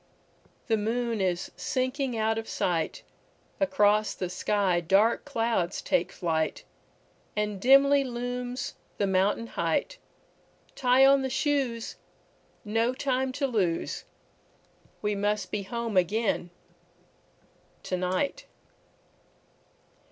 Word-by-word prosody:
The 225 - +2
moon 230 +1 -1
is 180 -2 -1
sinking 260 -2 -1
out 220 0 +1
of 225 - -8
sight, 165 -3 -1 0.6
Across 215 -7 +3
the 180 -2 -4
sky 190 -1 +1
dark 200 +7 +3
clouds 225 -9 0
take 275 - 0
flight, 160 -3 -1 0.7
And 210 -2 -2
dimly 275 +3 +6
looms 245 0 -4 0.2
the 205 - +1
mountain 195 +4 +1
height; 170 - -1 0.7
Tie 255 +1 +4
on 275 0 +6
the 265 - -2
shoes, 265 -4 -1 0.7
no 225 +4 +1
time 260 -1 0
to 280 +1 -1
lose, 195 -10 -1 1.0
We 210 0 +1
must 205 +1 -1
be 210 - -1
home 230 +2 -4
again 190 0 +1 1.3
to 185 - -2
night. 185 - -1
225 Hz, 105 wpm, -28 LUFS, 195-255 Hz, 1.3 s, dimly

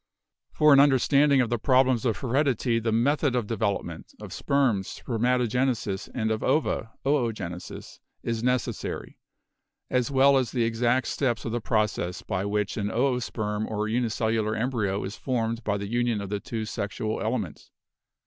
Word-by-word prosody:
For 150 -1 +5
an 140 - +7
understanding 140 0 +4
of 120 -1 -1
the 120 - 0
problems 130 0 +3
of 115 - +1
heredity 130 -3 +1
the 115 0 -1
method 135 +4 +2
of 120 -3 0
development, 100 -7 -3
of - - -8
sperms, 125 -9 +1
'spermatogenesis,' 120 -3 -1
and 110 -3 0
of 110 - -1
ova, 150 -7 0 0.2
'oogenesis,' 115 -11 -3 0.2
is 115 -1 -2
necessary 125 0 -2 0.7
as 125 -2 +1
well 135 0 +5
as 125 -3 -1
the 120 -3 +1
exact 120 +2 +1
steps 120 -5 -1
of 115 - -2
the 120 0 -2
process 105 -5 -1
by 95 +2 -2
which 105 +1 -1
an 100 -2 -1
oosperm 115 -4 -1
or 110 0 -2
unicellular 110 -1 0
embryo 110 -5 -1
is 100 +3 -5
formed 115 -2 -2
by 100 -1 0
the 100 0 -5
union 120 0 0
of 100 -1 -5
the 105 0 -2
two 110 +1 -4
sexual 110 0 -3
elements. 110 -8 -3
115 Hz, 155 wpm, -26 LUFS, 110-125 Hz, 0.7 s, an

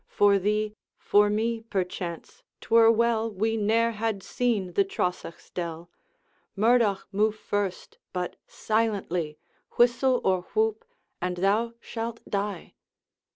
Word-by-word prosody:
For 200 -1 +4
thee 210 +2 0 0.2
for 205 0 +3
me, 225 +2 0
perchance 180 -5 -4 0.2
't - - -15
were 230 0 +8
well 230 0 +2
We 220 +3 0
ne'er 225 +2 +2
had 215 -3 -2
seen 215 -8 -1
the 200 - +4
Trosachs' 180 -3 -4
dell. 170 -1 -5 0.6
Murdoch, 220 -2 +3
move 215 +2 +2
first 205 -3 -3
but 180 -1 -3
silently; 195 -8 -1 0.4
Whistle 245 +1 +3
or 185 -1 +2
whoop, 220 0 +1 0.4
and 180 0 -2
thou 215 +5 +1
shalt 230 0 -5
die!' 200 -3 -3
210 Hz, 120 wpm, -27 LUFS, 190-225 Hz, 0.6 s, were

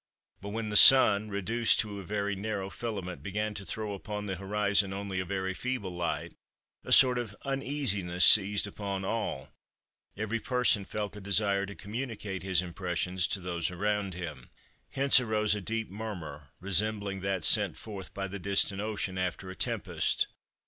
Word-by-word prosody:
But 100 - -7
when 110 +1 -4
the 105 - -4
Sun, 105 -4 +9
reduced 110 +4 +1
to 105 -2 -7
a - - -8
very 100 +1 -2
narrow 100 -1 -4
filament, 100 -6 -6
began 105 +2 -3
to 100 - -6
throw 105 +1 -4
upon 105 +1 -6
the 95 -2 -3
horizon 100 0 0
only 100 -1 -4
a 95 - -3
very 95 0 -3
feeble 125 -3 -4
light, 85 -1 -3 0.5
a - - -8
sort 125 -2 +6
of 110 -4 -6
uneasiness 125 - +1
seized 100 -1 +6
upon 100 -2 -5
all; 105 -12 -3 0.7
every 110 +2 -2
person 125 -5 +1
felt 105 +1 -5
a 105 - -9
desire 100 0 +1
to 100 - -9
communicate 105 -1 -6
his 95 -2 +1
impressions 90 0 -2
to 100 - -1
those 85 -2 -3
around 100 +1 -2
him. 80 -8 -8 0.4
Hence 135 -1 +4
arose 110 -3 0
a 105 - -4
deep 110 +1 -4
murmur, 85 -10 -8
resembling 100 +1 0
that 95 -2 -2
sent - - +5
forth 100 -4 -8
by 100 0 -5
the 100 +1 -7
distant 100 +1 0
ocean 105 -3 -3
after 90 +1 -4
a - - -10
tempest. - - -1
100 Hz, 165 wpm, -29 LUFS, 95-105 Hz, 0.7 s, Sun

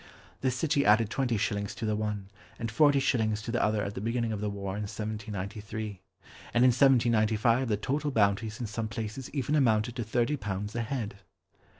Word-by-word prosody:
The 130 - +1
city 140 +3 +1
added 110 +1 +4
twenty 125 -4 0
shillings 100 -1 -2
to 115 - -4
the 110 -1 +1
one, 105 -2 -3 0.3
and 115 -1 -4
forty 145 +3 +5
shillings 110 -5 +1
to 115 - -4
the 120 - +1
other 105 -1 +1
at 100 - -4
the 95 - -5
beginning 115 +1 -1
of 105 -2 -3
the 105 - -1
war 100 -1 -4
in 105 - -3
1793. 105 -1 -5 0.5
And 120 - +5
in - - +7
1795 115 -1 +3
the 105 -2 +1
total 145 +7 -1
bounties 110 -1 +1
in 120 - -2
some 110 +1 -3
places 110 +3 -5
even 140 0 -2
amounted 120 -5 +2
to 120 - -1
thirty 120 +6 0
pounds 105 -1 -4
a 120 - 0
head! 115 -4 -3
110 Hz, 195 wpm, -29 LUFS, 105-125 Hz, 0.5 s, in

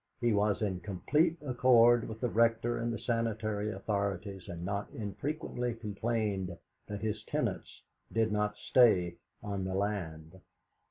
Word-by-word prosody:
He 120 -2 +2
was 105 0 +2
in 95 -3 -1
complete 150 - +1
accord 120 -2 +5
with 110 0 -7
the 125 - +2
Rector 115 +1 +2
and 120 0 -1
the 115 - -2
sanitary 110 -3 -1
authorities, 100 -3 -3
and 85 0 -5
not 100 +1 -2
infrequently 120 - -3
complained 105 -4 -2 0.3
that 105 -1 -5
his 110 -1 -2
tenants - - -3 0.3
did 110 -1 +1
not 105 0 0
stay 90 -9 +4 0.3
on 100 -2 -3
the 95 0 -2
land. 95 -4 -3
105 Hz, 140 wpm, -32 LUFS, 100-115 Hz, 0.3 s, accord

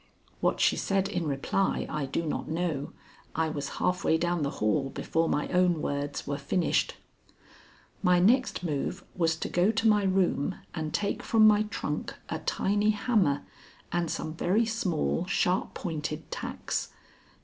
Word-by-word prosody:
What - - +1
she - - +4
said 195 -1 +1
in 175 -5 -2
reply 145 +7 0
I 145 -3 -2
do 165 +5 -2
not 150 - -3
know. 160 -3 -2 0.4
I 160 0 +1
was 145 -2 -3
half 180 0 0
way 160 - +3
down 175 0 0
the 140 - +1
hall 135 +6 +1
before 165 +4 -1
my 150 - 0
own 180 -2 +3
words 145 -1 -3
were 140 0 -3
finished. 180 -3 +1 1.1
My 180 -2 +4
next 230 +3 +3
move 170 +3 -2
was 165 -2 +2
to - - -4
go 180 +3 +2
to 225 0 +2
my 210 -1 +5
room 185 -4 +1 0.2
and 155 -2 -3
take 200 - -1
from 220 -1 +4
my 215 0 +6
trunk 150 -7 -3
a 160 - -2
tiny 205 +6 +1
hammer 205 - +2 0.5
and 175 -1 0
some 155 - -3
very 190 +7 +2
small, 185 -5 -1
sharp 185 -1 +1
pointed 155 -2 -4
tacks. - - -3
175 Hz, 160 wpm, -29 LUFS, 155-195 Hz, 1.1 s, my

